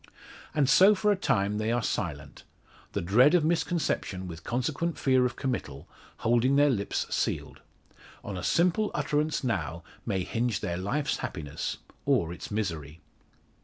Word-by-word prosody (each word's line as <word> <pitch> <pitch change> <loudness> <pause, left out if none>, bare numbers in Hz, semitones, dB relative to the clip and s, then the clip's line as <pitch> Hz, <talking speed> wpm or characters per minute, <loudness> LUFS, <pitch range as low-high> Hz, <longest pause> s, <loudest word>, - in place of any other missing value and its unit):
And 145 -3 +3
so 195 +9 +7
for 210 +2 +2
a - - +3
time 105 - 0
they 110 +1 0
are 120 0 0
silent, - - -4 0.5
the - - -2
dread 125 - +5
of 165 -3 +3
misconception, 160 - -1
with 85 -2 -8
consequent 140 +7 -1
fear 130 -2 +3
of 125 - -8
committal, 75 - -4 0.4
holding 120 +4 +3
their 145 0 +5
lips 100 -5 -1
sealed. - - -2 0.6
On 100 - -5
a 90 - -4
simple 180 +5 +2
utterance 150 0 0
now 85 - -2 0.2
may 95 -5 -1
hinge 115 0 -1
their 85 -5 -2
life's 140 +10 -1
happiness, 75 -5 -4 0.3
or 85 +1 +2
its - - -8
misery. 85 -8 -3
120 Hz, 150 wpm, -28 LUFS, 95-150 Hz, 0.6 s, so